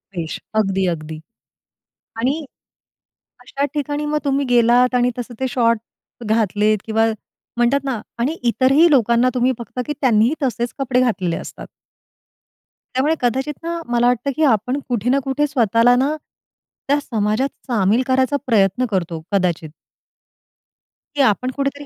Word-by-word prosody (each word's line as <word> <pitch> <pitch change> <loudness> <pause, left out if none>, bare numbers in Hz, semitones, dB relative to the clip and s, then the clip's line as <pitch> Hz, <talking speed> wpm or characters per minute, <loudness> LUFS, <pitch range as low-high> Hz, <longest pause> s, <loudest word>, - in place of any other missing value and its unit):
वेश 165 -2 -4 0.2
अगदी, 195 -2 +1
अगदी. 155 0 -8 1.0
आणि 280 +6 -1 1.0
अशा 280 +1 -3
ठिकाणी 290 +1 -2
मग 300 0 0
तुम्ही 280 0 +1
गेलात 245 +1 +4
आणि 245 0 +3
तसं 240 0 -6
ते 265 - 0
शॉर्ट 230 -2 +2 0.5
घातलेत 215 -1 +2
किंवा 225 0 +1 0.5
म्हणतात 255 +4 +2
ना 260 -5 -2 0.2
आणि 285 +8 -1
इतरही 270 +8 +4
लोकांना 240 -2 +3
तुम्ही 250 +1 +2
फक्त 235 +1 -9
की 295 - -2
त्यांनीही 240 +1 +3
तसेच 240 -2 -1
कपडे 255 -2 +1
घातलेले 185 -9 0
असतात. - - -8 1.3
त्यामुळे 275 +5 +2
कदाचित 265 +4 0
ना 335 0 -3
मला 240 0 +3
वाटतं, 250 +3 +1
की 315 - 0
आपण 250 +1 +2
कुठे 240 -1 -1
ना 275 - +3
कुठे 285 +2 0
स्वतःला 235 -2 +3
ना 275 +5 +1 0.7
त्या 285 +1 +2
समाजात 225 +1 -1 0.2
सामील 220 0 +2
करायचा 260 +2 +2
प्रयत्न 210 +1 +2
करतो 170 -5 -2
कदाचित. 175 -5 0 1.5
की 285 - +1
आपण 255 +1 +2
कुठेतरी 280 +1 -3
245 Hz, 135 wpm, -19 LUFS, 220-275 Hz, 1.5 s, गेलात